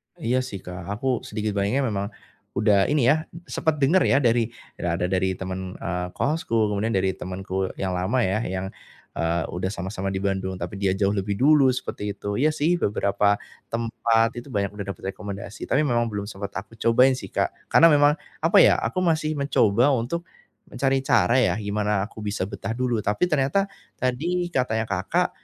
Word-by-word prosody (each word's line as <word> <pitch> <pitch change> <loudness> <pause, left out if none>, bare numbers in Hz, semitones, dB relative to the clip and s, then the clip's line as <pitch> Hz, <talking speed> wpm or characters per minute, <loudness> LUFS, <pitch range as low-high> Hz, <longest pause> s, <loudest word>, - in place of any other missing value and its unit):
Iya 125 +3 0
sih 100 -7 -5
Kak 90 -1 -7
aku 110 +6 -4 0.2
sedikit 105 0 -2
banyaknya 105 +8 +1
memang 100 -4 -1 0.5
udah 100 -2 +4
ini 145 -4 +2
ya, - - +5 0.3
sempat 160 -1 -1
dengar 150 +7 +4
ya, - - +4
dari 120 -3 +2 0.3
ya 85 -1 -1
ada - - 0
dari 95 0 0
teman, 95 0 -5
eee, 90 +1 -3
kosku 150 -5 -1 0.2
kemudian 105 +3 0
dari 95 0 +1
temanku 95 +1 -4
yang 95 -1 -2
lama 95 +7 0
ya 95 +4 0
yang, 95 -3 -3 0.5
eee, 85 0 0
udah 90 +2 -2
sama-sama 95 0 -4
di 95 - -2
Bandung, 95 -1 -2
tapi 90 +2 -5
dia 95 -1 +1
jauh 100 0 +2
lebih 100 0 -2
dulu 140 +1 +5
seperti 105 -5 -3
itu. 100 +1 -4
Iya 150 +3 +4
sih 155 +3 +1
beberapa 100 0 +2 0.3
tempat 115 0 +1
itu 140 - -14
banyak 100 -3 -1
udah 100 -2 -6
dapat 95 0 -5
rekomendasi, 100 +2 -7
tapi 150 +2 +3
memang 120 -3 +1
belum 100 -1 -4
sempat 100 -1 -6
aku 105 +3 -7
cobain 125 +3 +5
sih 130 - -6
Kak, - - -1 0.2
karena 165 - +7
memang 145 0 +5 0.3
apa 165 +2 +4
ya - - +6
aku 185 - -1
masih 155 -2 +1
mencoba 130 -2 +3
untuk 135 +8 -2 0.4
mencari 135 -1 0
cara 125 0 +4
ya, 130 - +3
gimana 105 0 -1
aku - - -12
bisa 105 -1 -2
betah 105 +2 -4
dulu, 120 -2 0
tapi 105 - +1
ternyata 155 +7 +1 0.3
tadi 170 +8 0
katanya 115 -7 0
Kakak, 95 -1 0
105 Hz, 180 wpm, -24 LUFS, 95-130 Hz, 0.5 s, karena